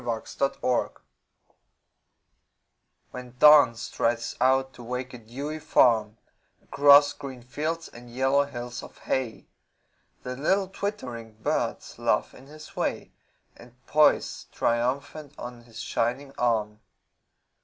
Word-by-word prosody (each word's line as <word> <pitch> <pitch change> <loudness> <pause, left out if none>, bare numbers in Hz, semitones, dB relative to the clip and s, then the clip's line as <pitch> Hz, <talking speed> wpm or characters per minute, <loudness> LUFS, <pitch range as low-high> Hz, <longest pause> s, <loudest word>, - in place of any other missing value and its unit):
Alarm 115 -2 -3
Clocks 125 -2 -1 2.2
When 125 -1 -9
Dawn 150 -4 +7
strides 115 0 -2
out 130 +1 +2
to 120 - -12
wake 125 +2 -5
a 125 - -8
dewy 140 +7 -6
farm 110 -6 +3 0.5
Across 145 0 +6
green 130 -4 -9
fields 155 +6 -3
and 120 +1 -13
yellow 135 +3 +2
hills 120 -2 -7
of - - -13
hay 130 -4 -3 0.8
The 125 0 -5
little 190 +8 +1
twittering 125 - -5
birds 110 +1 -3
laugh - - 0
in 130 - -15
his 155 +1 -13
way - - -2 0.4
And 120 0 -16
poise 150 0 +2
triumphant 140 +5 -2
on 120 -1 -9
his 115 -1 -12
shining 135 +4 -2
arm. 110 -3 0
125 Hz, 115 wpm, -26 LUFS, 120-145 Hz, 2.2 s, Dawn